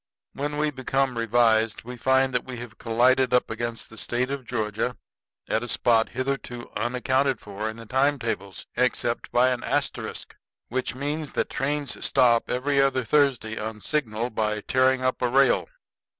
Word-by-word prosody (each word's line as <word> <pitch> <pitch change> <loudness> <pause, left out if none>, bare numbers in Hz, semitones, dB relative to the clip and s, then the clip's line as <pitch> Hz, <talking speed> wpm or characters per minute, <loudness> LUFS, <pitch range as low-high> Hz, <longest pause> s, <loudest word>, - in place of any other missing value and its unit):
When 145 +1 -3
we 150 0 +1
become 135 -1 0
revised, 115 -1 +2
we 125 +2 -7
find 130 +1 +2
that 125 - +1
we 130 -1 -7
have 115 -1 -9
collided 125 +2 +3
up 125 - +1
against 115 0 -4
the 110 - -8
State 125 +2 -1
of 140 -2 -4
Georgia 110 +1 -2 0.5
at 110 - +1
a 120 - -5
spot 115 -2 +2
hitherto 130 -1 -4
unaccounted 130 +2 +1
for 105 +1 -5
in 110 - -8
time 140 +4 +2
tables 100 -6 -4
except 120 -1 0
by 125 +1 +4
an 125 -2 -2
asterisk, - - -3 0.3
which 130 0 -2
means 145 +3 -3
that - - -1
trains 145 +1 -2
stop 120 -3 +3
every 140 +2 +1
other 135 -1 +2
Thursday 125 -5 +1
on 110 0 -5
signal 120 -1 -2
by 105 -1 -1
tearing 130 +3 +2
up 130 0 0
a 125 - +2
rail. 135 +2 +3
125 Hz, 165 wpm, -25 LUFS, 115-135 Hz, 0.5 s, by